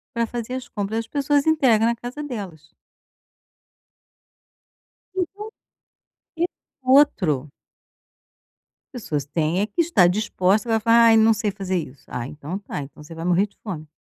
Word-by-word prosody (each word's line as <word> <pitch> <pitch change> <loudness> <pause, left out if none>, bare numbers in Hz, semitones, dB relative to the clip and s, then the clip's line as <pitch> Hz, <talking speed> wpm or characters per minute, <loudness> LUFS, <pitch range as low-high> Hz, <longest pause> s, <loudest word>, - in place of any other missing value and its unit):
para 235 0 +1
fazer 240 +1 -5
as 260 -1 -5
compras, 210 +1 -2
as 230 - -5
pessoas 285 +2 +1
entregam 260 -9 +4
na 235 - +2
casa 245 +5 -7
delas. 190 - -7 2.4
Então, 380 +2 -3 1.0
esse 345 +2 0 0.3
outro 190 - +3 1.4
As 245 -4 -7
pessoas 145 -3 -2
têm 160 +4 0
é - - +2
que 220 +11 0
está 320 - +4
dispostas, 205 +2 +1
vai 225 - +3
falar: 230 +1 +5
"Ai 225 -1 +6
não 220 +1 +5
sei 210 -1 -1
fazer 190 -2 -2
isso", 145 -5 -7
ah 120 -1 -5
então 150 +6 -6
tá, 195 -7 -6
então 140 +1 -11
você 165 +2 -11
vai 165 +1 -6
morrer 180 +3 +3
de 205 - -33
fome. 165 -8 -6
210 Hz, 155 wpm, -23 LUFS, 170-245 Hz, 2.4 s, Ai